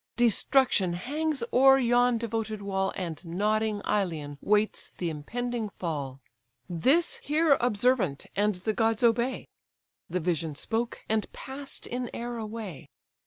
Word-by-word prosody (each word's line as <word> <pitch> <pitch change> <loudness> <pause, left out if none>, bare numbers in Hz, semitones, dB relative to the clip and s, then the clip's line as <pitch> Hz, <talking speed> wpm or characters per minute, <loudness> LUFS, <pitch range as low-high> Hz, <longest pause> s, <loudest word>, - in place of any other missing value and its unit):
Destruction 240 -4 +3
hangs 285 - -1
o'er 270 +1 +7
yon 245 -1 +3
devoted 225 -2 -3
wall, 195 -1 -1
And 170 -4 -4
nodding 210 +4 0
Ilion 155 -8 -1
waits 210 +1 +1
the 170 -2 -2
impending 230 +9 -3
fall. 140 -8 -4 0.5
This 265 - +2
hear 305 0 +3
observant, 235 - +2
and 210 0 +2
the 195 +5 -2
gods 225 +1 +1
obey!' 235 +2 +2 0.6
The 180 +2 -1
vision 160 -3 -1
spoke, 230 +9 -2
and 220 -1 0
pass'd 275 +1 -7
in 245 0 -3
air 240 0 -4
away. 215 -8 -6
220 Hz, 125 wpm, -28 LUFS, 180-245 Hz, 0.6 s, o'er